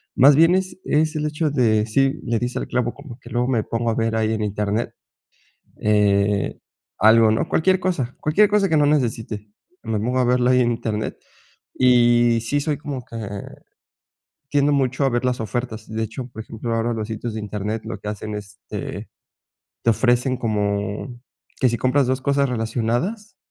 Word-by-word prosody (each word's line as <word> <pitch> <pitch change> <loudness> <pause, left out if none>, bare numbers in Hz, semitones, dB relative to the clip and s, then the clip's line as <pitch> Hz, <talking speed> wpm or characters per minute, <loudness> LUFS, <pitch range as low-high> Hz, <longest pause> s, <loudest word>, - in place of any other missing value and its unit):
más 140 +3 +7
bien, 165 +4 +5
es 190 0 -2
es 155 +1 +1
el 150 - -1
hecho 150 0 -1
de 110 -6 +2
sí, 135 +6 +1
le 115 -1 0
diste 125 0 -3
al - - -3
clavo, 120 -1 0
como 140 -4 -12
que - - -13
luego 120 +1 0
me 120 -5 +1
pongo 115 +1 -1
a - - -2
ver 115 0 0
ahí 110 0 +1
en 110 - -2
internet, 105 +2 -1 0.9
eh, 105 -1 +2 0.4
algo, 110 +1 +6
¿no?, 110 - 0
cualquier 185 +3 +2
cosa, 145 -10 -1
cualquier 200 +7 +3
cosa 205 -2 +3
que 160 - +2
no 150 - +4
necesite, 115 -7 -1 0.4
me 110 -1 -1
pongo 125 +5 -1
a 125 - +3
verla 125 0 +3
ahí 125 0 +4
en 120 -1 +2
internet. 110 -2 -3 0.6
Y 120 -2 +4
sí, 145 +5 0
soy 145 +1 -1
como 140 -3 -5
que 115 - -10 1.3
tiendo 145 0 +3
mucho 135 -1 +1
a 135 - +3
ver 120 +1 -1
las 125 -2 -1
ofertas. 115 -1 -4
De 110 0 -3
hecho, 120 +3 -5
por 110 - -7
ejemplo, 115 +1 -5
ahora 115 +1 0
los 110 -1 -4
sitios 110 0 -4
de 110 - -3
internet 105 +1 -4
lo - - -5
que 105 - -7
hacen, 105 0 -5
este, 100 -2 -7 0.7
te - - +3
ofrecen 125 +2 +1
como 105 +1 -2 0.4
que 130 - +4
si 120 - -1
compras 130 +3 +2
2 130 0 0
cosas 140 0 +2
relacionadas. 120 - -2
120 Hz, 185 wpm, -22 LUFS, 110-135 Hz, 1.3 s, más